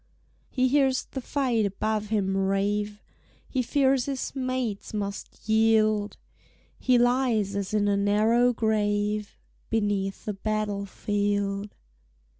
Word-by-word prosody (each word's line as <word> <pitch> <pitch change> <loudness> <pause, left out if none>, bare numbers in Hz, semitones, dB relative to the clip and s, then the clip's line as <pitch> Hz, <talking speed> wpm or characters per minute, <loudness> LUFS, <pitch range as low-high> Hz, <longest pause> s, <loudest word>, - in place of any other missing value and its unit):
He 255 -1 +1
hears 265 -1 +2
the 265 - -6
fight 250 -4 0
above 210 +2 -1
him 200 -3 0
rave; 205 +2 0 0.4
He 260 - -1
fears 265 0 +2
his 275 -1 -4
mates 255 -6 -3
must 200 0 -5
yield; 215 -1 +3 0.6
He 255 -2 +3
lies 240 -5 +2
as 200 -2 -3
in 210 -1 +1
a 200 0 +2
narrow 215 +5 +3
grave 210 -2 0 0.3
Beneath 205 -3 -1
a 210 - -1
battle 205 0 -2
field. 205 0 -2
215 Hz, 115 wpm, -26 LUFS, 205-245 Hz, 0.6 s, yield